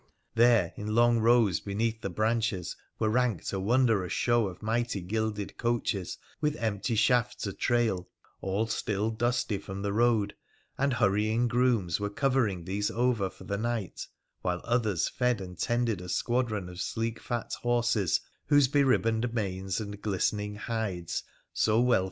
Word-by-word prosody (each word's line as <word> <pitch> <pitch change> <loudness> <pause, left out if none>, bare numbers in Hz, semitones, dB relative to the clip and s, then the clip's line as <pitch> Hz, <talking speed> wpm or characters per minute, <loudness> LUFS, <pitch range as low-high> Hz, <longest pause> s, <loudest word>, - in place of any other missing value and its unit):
There 115 0 +4
in 105 +1 -3
long 120 0 +5
rows 115 -6 +4
beneath 110 +3 -2
the 100 - -3
branches 110 -1 -1 0.2
were 110 - +1
ranked 120 -7 0
a 95 - -1
wondrous 110 -3 +2
show 120 -3 +2
of 90 +2 -9
mighty 115 -1 0
gilded 105 +2 -3
coaches 115 -6 -1 0.2
with 150 -1 +1
empty 115 -1 -1
shafts 125 +2 +2
a 100 - -3
trail, 115 -7 0 0.3
all 95 +3 0
still 110 -1 -1
dusty 120 -2 0
from 95 0 -7
the 100 -1 -1
road, 110 -2 +2 0.4
and 140 0 +1
hurrying 110 +2 +2
grooms 120 -8 +1
were 105 0 -1
covering 110 -7 0
these 100 +2 -1
over 120 -5 +1
for - - -14
the 100 0 -3
night, 115 -5 -3 0.3
while 90 -1 -1
others 110 -8 +1
fed 125 -3 0
and 90 -2 -8
tended 120 -5 0
a 90 - -8
squadron 110 -2 0
of 90 0 -7
sleek 115 0 -2
fat 120 -2 -4
horses, 120 -6 +2 0.3
whose 145 -2 +5
be 140 +2 +3
ribboned 115 -3 +2
manes 95 -3 -2
and 105 -1 -6
glistening 105 +1 -1
hides 105 -6 -3 0.3
so 110 +1 +2
well 125 -2 +4
110 Hz, 155 wpm, -29 LUFS, 100-120 Hz, 0.4 s, long